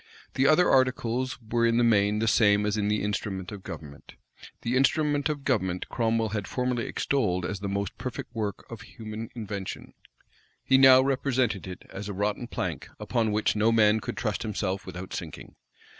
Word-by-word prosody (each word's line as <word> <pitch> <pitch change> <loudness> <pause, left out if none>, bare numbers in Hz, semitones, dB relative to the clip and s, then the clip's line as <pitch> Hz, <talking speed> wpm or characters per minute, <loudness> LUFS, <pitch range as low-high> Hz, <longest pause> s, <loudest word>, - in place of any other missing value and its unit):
The 135 +1 +2
other 165 +4 +5
articles 130 -1 +1
were 115 0 -1
in 115 0 +3
the 120 - +4
main 105 -2 +3
the 115 +1 0
same 105 -2 +4
as 105 0 0
in 105 -1 0
the 105 0 0
instrument 100 -2 -3
of 105 -2 -8
government. 70 -6 -10 0.5
The 120 +2 0
instrument 145 +2 +2
of 145 -2 -3
government 95 -9 0
Cromwell 115 -1 0
had 105 -2 -3
formerly 125 -2 -1
extolled 95 -10 0
as 95 - -3
the 100 0 -4
most 100 0 -2
perfect 120 -1 -6
work 105 -4 -4
of 115 -2 -9
human 110 -2 -8
invention: 100 -4 -6 0.7
he 135 0 +4
now 130 -1 +8
represented 130 - 0
it 90 -1 -8
as 100 +2 -6
a - - -3
rotten 105 +4 -2
plank, - - -4
upon 115 -3 0
which 105 +1 +1
no 110 +2 +3
man 110 -1 +4
could - - -6
trust 110 -3 -2
himself 100 -3 -3
without 90 +1 -7
sinking. - - -7
110 Hz, 180 wpm, -27 LUFS, 100-125 Hz, 0.7 s, now